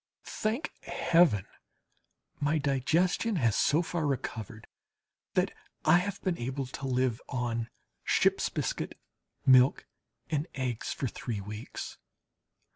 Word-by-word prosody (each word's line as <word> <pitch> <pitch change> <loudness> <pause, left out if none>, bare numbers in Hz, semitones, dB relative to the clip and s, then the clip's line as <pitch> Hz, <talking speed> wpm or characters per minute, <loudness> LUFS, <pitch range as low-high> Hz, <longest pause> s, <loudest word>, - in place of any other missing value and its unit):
Thank 230 +9 -2
Heaven! 165 - +3 0.9
my 150 +2 +2
digestion 160 - +1
has 115 - +2
so 160 +4 +3
far 165 -2 -1
recovered 110 -5 -4 0.7
that - - +2 0.3
I 165 +3 +7
have 195 +2 -3
been 185 -3 0
able 130 +3 -2
to 135 +2 -6
live 130 -2 +1
on 120 -3 -2 0.3
ships - - +3
biscuit, - - -3 0.5
milk 130 +1 +6 0.5
and 150 +1 0
eggs 125 -4 -2
for - - -2
three 115 -2 -4
weeks. 105 +3 -7
135 Hz, 115 wpm, -30 LUFS, 120-165 Hz, 0.9 s, I